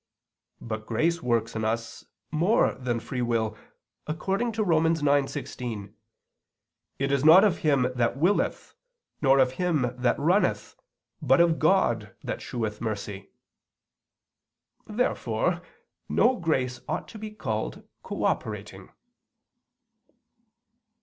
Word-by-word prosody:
But 110 -1 -5
grace 165 +9 +1
works 115 -3 0
in 110 - -2
us 115 +1 -3 0.3
more 175 +8 +3
than 125 -2 -2
free 125 +2 -4
will, 115 -2 0 0.5
according 195 +9 -1
to 215 0 0
Rom. 165 -4 +3
9:16: 135 -8 -1 1.0
"It 135 0 -1
is 140 -1 +1
not 165 +5 +8
of 200 -5 +2
him 140 -5 +2
that 120 0 0
willeth, 175 +8 0 0.5
nor 135 -1 +5
of 130 -2 +4
him 155 -9 +1
that 125 0 +1
runneth, 175 +8 +1 0.5
but 135 -1 +4
of 170 -2 +4
God 120 - +2
that - - -4
sheweth 110 -3 -4
mercy." 105 -3 -5 1.6
Therefore 220 +4 0 0.5
no 255 +2 +3
grace 130 - -1
ought - - -3
to 220 - -10
be 215 0 -6
called 215 - -4 0.2
cooperating. - - -3
135 Hz, 110 wpm, -27 LUFS, 115-170 Hz, 1.6 s, not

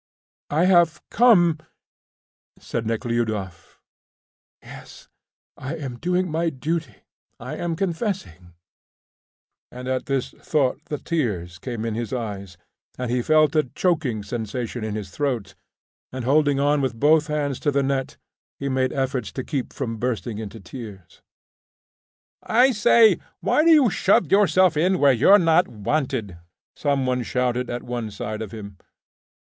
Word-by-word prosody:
"I 160 +4 +2
have 175 -3 +4
come," 175 -10 +5 1.0
said 115 -1 -4
Nekhludoff. 110 -6 -3 0.8
"Yes, - - -13 0.5
I 140 +5 -5
am 135 -6 -6
doing 180 +3 0
my 165 +1 0
duty 155 -3 -3 0.4
I - - -6
am 170 -1 -2
confessing," 165 - -4 1.2
thought - - -17
Nekhludoff; - - -7
and 125 - -7
at 130 0 -1
this 135 -2 -1
thought 140 -1 -1
the 150 - -4
tears 100 - -3
came 120 -1 -5
in 115 - -2
his 115 0 -4
eyes, 100 -7 -5 0.4
and 125 -1 -3
he 125 0 +1
felt 155 +2 +3
a 155 - +5
choking 150 - 0
sensation 115 +2 -4
in 110 -1 -3
his 100 -4 -6
throat, 120 -8 -2 0.6
and 130 -2 -5
holding 145 +1 +3
on 145 +1 +2
with 125 -4 -2
both 155 +2 +4
hands 145 -3 -2
to 150 - 0
the 140 -1 +1
net, 135 -1 -2 0.4
he 140 - -3
made 130 -1 0
efforts 130 -3 -2
to 130 - -4
keep 135 -3 -3
from 115 -4 -4
bursting 120 -2 -3
into 110 0 -7
tears. 100 - -11 1.2
"I 250 +4 +4
say, 225 0 +5 0.2
why 305 - +2
do 335 - +4
you 295 -8 +6
shove 185 -5 +2
yourself 185 -3 +4
in 180 +5 +2
where 140 -4 +5
you're 190 - +6
not 170 -1 +3
wanted?" 110 - -3 0.4
some 140 -3 0
one 125 0 0
shouted 125 0 -1
at 120 0 -4
one 120 -2 -4
side 105 +1 -5
of 110 -3 -6
him. 100 -4 -9
130 Hz, 150 wpm, -23 LUFS, 115-160 Hz, 1.2 s, you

